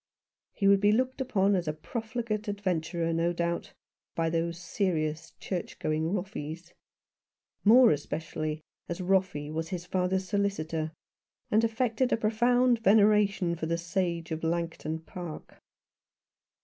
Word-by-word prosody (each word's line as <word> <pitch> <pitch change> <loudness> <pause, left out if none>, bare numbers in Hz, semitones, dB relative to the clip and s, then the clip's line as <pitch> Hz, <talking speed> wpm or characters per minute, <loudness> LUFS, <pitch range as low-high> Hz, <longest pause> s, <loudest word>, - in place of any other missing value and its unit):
He 200 - +1
would 200 0 +6
be 205 0 +5
looked 255 +4 0
upon 205 -6 +2
as 175 -3 -1
a 155 - 0
profligate 220 +5 -4
adventurer, 175 -4 -1
no 165 +1 +1
doubt, 170 0 -2 0.4
by 165 -1 0
those 165 0 -1
serious 165 -3 -2
church 180 -3 -4
going 155 +2 -1
Roffeys; 175 -4 -5 0.9
more 235 +3 +7
especially 155 +1 -3 0.3
as 170 - -3
Roffey 185 -5 0
was 160 +1 -3
his 175 -1 -4
father's 185 +1 0
solicitor, 165 -6 -1 0.6
and 220 +2 +4
affected 230 +2 +1
a - - +3
profound 240 +2 +3
veneration 205 -4 +4
for 160 -1 -4
the 170 +1 0
sage 170 -1 -2
of 160 0 -3
Langton 165 -1 -2
Park. 170 -1 -9
180 Hz, 130 wpm, -29 LUFS, 165-210 Hz, 0.9 s, more